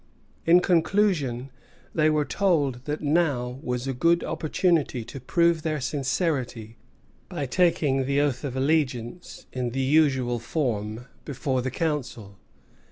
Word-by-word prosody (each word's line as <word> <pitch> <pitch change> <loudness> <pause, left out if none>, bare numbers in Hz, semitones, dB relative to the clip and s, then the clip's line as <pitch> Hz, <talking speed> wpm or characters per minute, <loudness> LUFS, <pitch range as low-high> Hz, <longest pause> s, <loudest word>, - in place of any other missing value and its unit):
In 175 +2 +7
conclusion, 165 - +1 0.4
they 155 -1 +3
were 150 -1 +1
told 145 -11 0
that 150 +1 -3
now 145 -5 0
was 125 0 -3
a 135 - -2
good 170 +7 +2
opportunity 155 -6 0
to 135 - -8
prove 170 +5 +2
their 155 -1 -2
sincerity 130 -5 -2 0.5
by 145 - -3
taking 140 -3 +2
the 140 +1 +1
oath 140 -4 0
of 135 -3 -4
allegiance, 135 +1 -1
in 125 -1 -2
the 130 +3 -4
usual 135 -4 +2
form, 115 -4 -2 0.2
before 135 -2 -2
the 130 - -2
Council. 125 - -3
140 Hz, 130 wpm, -25 LUFS, 125-160 Hz, 0.5 s, In